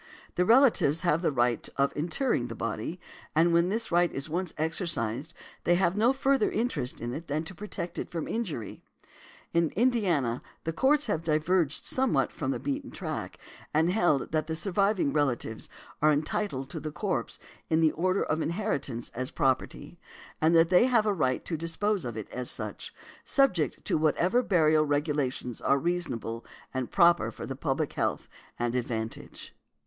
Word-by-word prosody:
The 180 - +1
relatives 225 - +5
have 170 -2 +2
the 170 - +1
right 120 -3 0
of 140 0 +1
interring 165 - 0
the 115 - -7
body, 115 +10 -4 0.4
and 170 +2 +4
when 170 +1 +3
this 225 +1 -2
right 175 0 +3
is 135 +2 -5
once 175 +2 -2
exercised 155 - -2 0.3
they 175 - +3
have 175 0 +2
no 225 +4 +4
further 270 -3 +2
interest 185 - -2
in 120 +1 -4
it 160 +5 -6
than 150 +2 -1
to 165 - -7
protect 185 -2 -6
it - - -4
from 165 -2 -4
injury. 170 - -4 0.7
In 170 -1 +3
Indiana, 185 - +1 0.2
the 165 - -2
Courts 290 - +3
have 165 -7 -1
diverged 160 0 +1
somewhat 260 -1 +1
from 135 - -4
the - - 0
beaten 280 -1 -3
track, - - -5 0.4
and 160 +3 +3
held 175 -8 +1
that 155 -1 0
the 160 - -2
surviving 195 -2 +1
relatives 125 -7 -1 0.3
are 155 +1 +5
entitled 145 -2 -2
to - - -4
the 155 - -5
corpse - - -2 0.3
in 160 - +3
the 160 -1 +4
order 185 +4 0
of 155 +1 -1
inheritance 160 - -2
as 130 +2 -4
property, 135 -4 -1 0.4
and 160 +2 +4
that 165 0 +5
they 180 +6 +6
have 240 -4 +3
a 210 - +2
right 130 -8 0
to 165 - -2
dispose 165 +4 -1
of 120 -2 -5
it 110 - -5
as 125 -1 -2
such, - - -3 0.3
subject 185 - +1
to - - +1
whatever 170 +9 +2
burial 155 -8 +3
regulations 145 -5 -1
are 140 - +3
reasonable 135 -9 -2 0.3
and 130 -2 -2
proper 175 -2 +4
for - - -8
the 135 - -5
public 140 +1 -1
health - - -1 0.3
and 120 0 -1
advantage. 115 -3 -4
160 Hz, 170 wpm, -28 LUFS, 140-185 Hz, 0.7 s, they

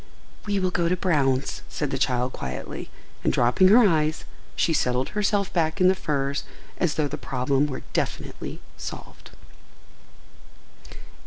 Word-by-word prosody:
"We 205 -1 +1
will 185 -1 0
go 170 -2 +1
to 180 - +2
Brown's," 140 -7 +1
said 145 -3 -3
the 135 - -2
child 125 -1 +1
quietly, 65 0 -6 0.3
and, - - +3
dropping 125 +10 +4
her 220 +3 +7
eyes, 155 -3 +1 0.3
she 165 - +2
settled 125 -3 +1
herself 205 -1 0
back 160 0 +1
in 185 0 +6
the - - +5
furs 140 -5 -1 0.4
as 175 -5 +1
though 150 -2 +1
the 145 +1 -6
problem 135 +2 0
were 130 -3 -6
definitely - - -3 0.2
solved. - - -8
150 Hz, 145 wpm, -25 LUFS, 135-185 Hz, 0.4 s, her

